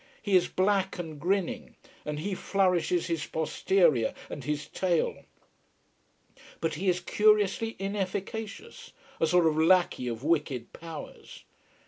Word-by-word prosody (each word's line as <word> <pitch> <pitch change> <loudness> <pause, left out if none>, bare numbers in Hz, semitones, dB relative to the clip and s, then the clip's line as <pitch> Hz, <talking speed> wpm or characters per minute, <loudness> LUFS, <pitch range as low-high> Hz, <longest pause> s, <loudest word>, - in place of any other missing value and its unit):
He 205 -3 +2
is 180 -1 +5
black 190 0 +1
and 160 -4 -6
grinning, 190 +1 -1 0.3
and 150 0 -3
he 195 +6 -3
flourishes 180 -2 +1
his 165 -3 -2
posterior 160 - +2 0.2
and 140 - -6
his 150 +2 -3
tail. 175 -1 -1 1.3
But 165 - -1
he 185 +5 0
is 180 0 +2
curiously 210 +3 +2
inefficacious: 200 - -5 0.3
a 160 - +3
sort 180 +1 +4
of 160 -1 +3
lackey 170 -6 +3
of 115 +1 -4
wicked 145 -6 -1
powers. 165 -2 -10
175 Hz, 125 wpm, -28 LUFS, 155-195 Hz, 1.3 s, is